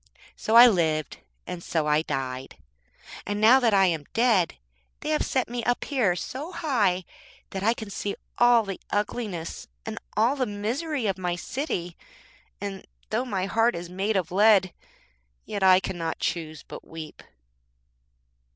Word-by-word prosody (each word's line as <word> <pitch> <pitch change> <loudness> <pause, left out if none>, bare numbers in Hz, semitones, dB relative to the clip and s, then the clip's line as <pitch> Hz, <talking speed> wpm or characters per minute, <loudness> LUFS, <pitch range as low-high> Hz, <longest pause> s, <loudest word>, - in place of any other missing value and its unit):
So 220 - -1
I 240 +1 +11
lived, 160 -8 +1 0.3
and 170 -1 -6
so 160 -2 -1
I 150 0 +3
died. 135 -4 -4 0.7
And 205 0 -3
now 230 +5 +7
that 240 -3 +3
I 195 -1 +5
am 165 -5 0
dead 225 -8 +3 0.5
they - - -4
have 305 -1 +1
set 260 -2 0
me 240 0 -4
up 245 - +1
here 240 -11 +1
so 275 - -5
high 215 - +1 0.5
that 190 - -4
I 225 +4 +2
can 220 -3 -8
see 200 0 -3 0.2
all 240 -1 +6
the 195 -2 -6
ugliness 205 -5 -3 0.2
and 220 0 -5 0.2
all 230 +6 +3
the 260 -3 -1
misery 240 +7 -2
of 195 -2 -1
my 180 -1 -1
city, 175 - -4 0.6
and 200 -1 -5 0.3
though 235 +4 0
my 195 -6 -2
heart 225 +4 +2
is 170 +1 -7
made 195 +3 0
of 180 -1 -2
lead 195 -2 +5 0.7
yet 205 - -4
I 185 -1 +7
cannot 175 -4 -3
choose 160 -3 -3
but - - -10
weep.' 160 -1 -9
200 Hz, 160 wpm, -26 LUFS, 175-235 Hz, 0.7 s, I